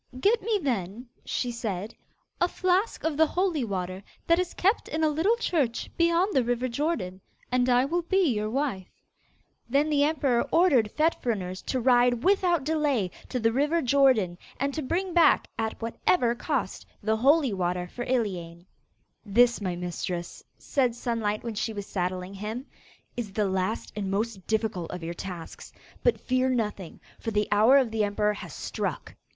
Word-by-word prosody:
'Get 440 - +3
me, 440 +1 +1
then,' 235 - -2 0.2
she 245 - -2
said, 215 -3 -4 0.5
'a 350 - +3
flask 370 +4 0
of 315 -2 -1
the 320 0 +5
holy 350 -5 0
water 185 -3 -3 0.2
that 335 +1 +4
is 365 -1 -2
kept 400 +6 +1
in 315 0 -2
a 310 - +4
little 330 +10 +2
church 300 - -1
beyond 340 +4 +2
the 260 - +4
river 245 +1 0
Jordan, 235 - -2 0.3
and 250 0 +2
I 250 +1 +4
will 345 +5 0
be 345 -4 +2
your 210 0 -2
wife.' 240 -7 -2 0.8
Then 285 +4 +2
the 285 -1 +3
emperor 280 -5 +2
ordered 280 -11 +4
Fet 310 +7 +1
Fruners 185 -6 -2
to 260 - 0
ride 245 -1 +3
without 360 -5 +3
delay 285 - 0 0.2
to 255 - -2
the 225 0 +2
river 295 +7 +1
Jordan, 245 -9 +3 0.2
and 280 0 0
to 315 - -2
bring 350 +6 -2
back, 340 -1 +5
at 220 0 -2
whatever 235 +2 +1
cost, 240 - -3 0.2
the 220 +1 +1
holy 275 0 +4
water 180 -1 -1
for 240 +7 -6
Iliane. 180 -9 -2 0.6
'This, 235 +3 +3
my 185 -3 -2
mistress,' 175 0 -5
said 250 -4 0
Sunlight, 230 -3 -2
when 230 -1 -4
she 220 +1 -2
was 205 -1 -5
saddling 185 0 -3
him, 215 +6 -5 0.5
'is 220 -5 -5
the 210 -1 +1
last 190 +3 -2
and 200 -2 -3
most 200 -1 -2
difficult 215 -6 -1
of 180 -2 -6
your 170 +1 -4
tasks. 175 -1 -8 0.3
But 485 - +2
fear 255 +1 +1
nothing, 210 -8 -2 0.2
for - - -3
the 210 -1 0
hour 220 +6 +6
of 255 -5 +2
the 220 -1 +1
emperor 210 +1 +1
has 205 - -8
struck. - - -4
240 Hz, 170 wpm, -27 LUFS, 205-295 Hz, 0.8 s, hour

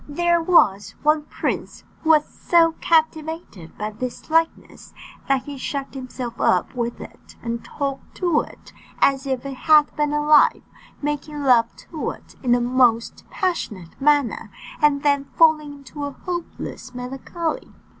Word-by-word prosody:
There 345 +3 +2
was 205 - +3
one 300 0 +3
prince - - -4 0.2
who 320 - -2
was 305 -2 +5
so 335 -1 +3
captivated 315 - -1
by 210 +1 -3
this 250 +7 -7
likeness, 325 0 -1 0.3
that 270 -1 +2
he 285 -2 -8
shut 275 +1 -4
himself 255 -2 -6
up 180 - +2
with 240 -1 -3
it, - - -13
and 235 0 -3
talked 275 -2 -5
to 350 -5 +2
it, - - -13 0.2
as 275 0 +2
if 260 -1 -2
it 275 - -4
had 300 +2 +4
been 295 -1 0
alive, 295 0 +4 0.4
making 295 0 -3
love 240 -3 +4 0.2
to 315 -3 -3
it - - -11
in 250 - 0
the 245 - +3
most 240 -2 +2
passionate 215 - -3
manner, 280 -6 +2 0.3
and 290 -2 +3
then 285 -1 +2
falling 310 -2 +4
into 285 +1 -8
a 285 - -4
hopeless 345 -7 -6
melancholy. 270 +6 -4
285 Hz, 145 wpm, -22 LUFS, 250-310 Hz, 0.4 s, was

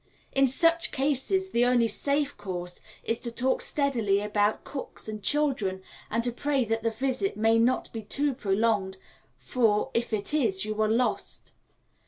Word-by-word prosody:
In 270 0 +4
such 335 +5 +2
cases 295 +8 +1
the 235 - +3
only 245 -1 +3
safe 280 +6 0
course 180 -2 -6 0.2
is 230 0 -1
to 235 - -4
talk 255 +3 0
steadily 235 -9 +1
about 210 0 0
cooks 275 -5 -7
and 215 -1 -5
children, 255 -10 0 0.3
and 230 +2 0
to 245 - +1
pray 275 +1 0
that 225 +1 -1
the 230 - +1
visit 260 - -2
may 225 +1 +3
not 245 +3 +1
be 225 - -4
too 280 +6 0
prolonged, 205 -4 0 0.4
for 220 -4 +1
if 235 +1 -1
it 210 +4 -3
is 215 -10 +1
you 215 0 -2
are 215 - +2
lost. 240 +3 -1
235 Hz, 165 wpm, -27 LUFS, 210-275 Hz, 0.4 s, In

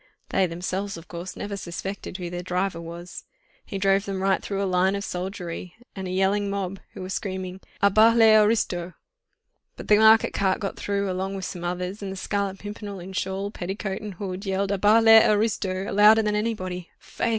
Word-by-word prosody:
They, 190 -1 +2
themselves, 185 +3 -4
of 165 +1 -12
course, 175 +1 -7
never 205 0 -5
suspected 190 +1 -6
who 175 -2 -5
their 175 0 -4
driver 180 -1 -2
was. 170 +1 -8 0.4
He 195 - -6
drove 195 0 +2
them 195 -1 -3
right 195 -1 +2
through 200 -1 -2
a - - +1
line 185 +1 +2
of 200 - -3
soldiery 180 -2 -5 0.2
and 190 -1 -5
a - - -4
yelling 195 +2 +1
mob, 195 -1 -3 0.2
who - - -6
were 185 - -6
screaming, 190 -1 -4 0.2
'À 200 -1 +5
bas 225 +2 +6
les 220 -1 +7
aristos!' 205 -5 +2 0.8
But - - -9
the 210 - +7
market 220 0 +6
cart 190 -1 +1
got 195 - -3
through 200 0 -2
along 190 +2 -3
with 190 -1 -4
some 175 -1 -6
others, 180 +3 -3
and 195 -1 -4
the - - -5
Scarlet 200 0 -2
Pimpernel, 205 -1 -7
in 185 +2 -9
shawl, 190 +2 -2
petticoat 195 +1 -4
and 210 -3 -7
hood, 190 0 -5
yelled 195 0 -1
'À 200 -2 -1
bas 215 +2 +5
les 225 0 +9
aristos!' 205 -3 0
louder 210 +2 +6
than 210 0 0
anybody. 185 -5 -3
Faith!" - - -3
195 Hz, 200 wpm, -25 LUFS, 185-205 Hz, 0.8 s, les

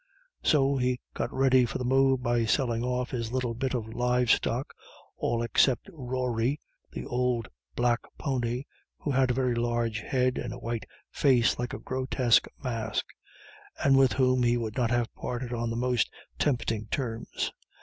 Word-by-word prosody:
So 140 -2 +3
he 125 0 +1
got - - -2
ready 130 -1 +4
for 120 - -2
the 125 - -3
move 135 0 +3
by 120 -1 +2
selling 120 -1 +1
off 125 0 -1
his 115 -3 -3
little 125 -2 -1
bit 130 +2 -2
of 115 -3 -3
live 125 0 +2
stock, 125 +4 0 0.4
all 115 0 0
except 120 +2 +2
Rory, 125 -1 -1 0.3
the - - -6
old 125 -4 0 0.3
black 120 -1 +2 0.2
pony, 125 -3 -1 0.3
who 145 - -3
had 130 -1 +3
a 125 - +1
very 130 -2 +1
large 120 -1 0
head 130 0 0
and 120 - -4
a - - -7
white 115 -2 -4 0.2
face 125 -5 +3
like 120 -1 -2
a - - -4
grotesque 130 -2 +2 0.2
mask, 115 -4 -2 0.8
and 135 -1 +6
with 135 -4 +5
whom 130 0 +3
he 120 0 +3
would 110 -2 -3
not 125 -3 +1
have 120 -1 0
parted 125 0 -4
on 120 0 -1
the 115 - -3
most 125 -1 +1 0.3
tempting 115 -5 0
terms. 115 -2 -3
125 Hz, 170 wpm, -28 LUFS, 120-130 Hz, 0.8 s, and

